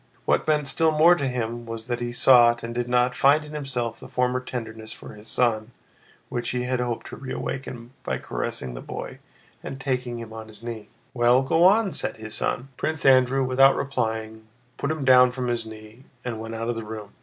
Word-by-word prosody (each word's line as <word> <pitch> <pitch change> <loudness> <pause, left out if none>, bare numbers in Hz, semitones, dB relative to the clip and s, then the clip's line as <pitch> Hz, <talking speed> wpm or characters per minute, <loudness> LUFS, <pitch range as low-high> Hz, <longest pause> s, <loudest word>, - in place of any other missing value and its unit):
What - - +1
meant 150 -1 +2
still 160 +3 +2
more 155 +3 +6
to 140 -6 -1
him 120 -2 -3
was 115 -1 -6
that 120 0 -2
he 120 0 -3
sought 120 -1 +5
and 115 0 -4
did 120 0 -2
not 125 0 +3
find 145 +4 +4
in 150 - -11
himself 125 -6 -3
the - - -10
former 125 0 0
tenderness 110 -3 -7
for - - -10
his 105 +1 -13
son 115 -1 0 0.5
which 120 -2 -3
he 125 0 -1
had 125 0 -1
hoped 120 -2 -2
to - - -8
reawaken 130 -2 -5
by - - -2
caressing - - -4
the - - -7
boy - - -7 0.4
and 135 - -6
taking 125 -3 -2
him 115 -1 -8
on 110 0 -8
his 110 0 -13
knee. 115 -3 -6 0.3
"Well, 120 +1 +4
go 165 +5 +2
on!" 200 +1 +5
said - - -4
his 110 -1 -8
son. 125 +3 -2
Prince 155 -2 -2
Andrew, 130 0 +5
without 135 +1 +5
replying, 110 -5 -3 0.3
put 140 - -2
him 155 -3 -2
down 125 -1 +7
from 125 -1 -2
his 115 -2 -2
knee 110 +3 -12 0.2
and 115 -3 -3
went 115 0 -6
out 115 +1 -3
of 120 - 0
the 115 -1 -5
room. 105 -1 -8
125 Hz, 210 wpm, -25 LUFS, 115-135 Hz, 0.5 s, down